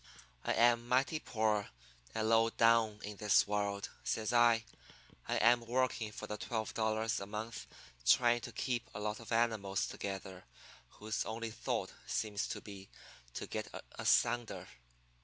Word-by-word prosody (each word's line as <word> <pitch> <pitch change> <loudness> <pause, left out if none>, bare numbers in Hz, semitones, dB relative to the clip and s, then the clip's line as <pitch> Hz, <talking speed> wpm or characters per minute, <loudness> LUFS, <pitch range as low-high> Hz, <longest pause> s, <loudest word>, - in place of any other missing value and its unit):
"'I - - +2
am 120 0 +4
mighty 135 +5 +2
poor 110 -6 0 0.5
and 110 - 0
low 115 0 +5
down 115 -2 +3
in 105 0 -6
the 105 0 -3
world,' 100 -1 -2
says 110 +1 -1
I. 120 -1 +5 0.6
'I - - 0
am 120 +1 +5
working 120 -3 0
for - - -7
twelve 110 -1 -3
dollars 110 0 0
a 100 - -6
month 110 +3 -5 0.4
trying 120 - +5
to - - -7
keep 120 -2 -2
a - - -4
lot 105 +1 -2
of 115 - -11
animals 110 -4 +1
together 95 -2 -6 0.5
whose 110 +1 -2
only 115 0 -4
thought - - -3
seems 105 -2 -1
to - - -5
be 100 -2 -10 0.5
to - - -3
get - - -4 0.3
asunder. 120 -1 +2
110 Hz, 145 wpm, -35 LUFS, 105-120 Hz, 0.6 s, low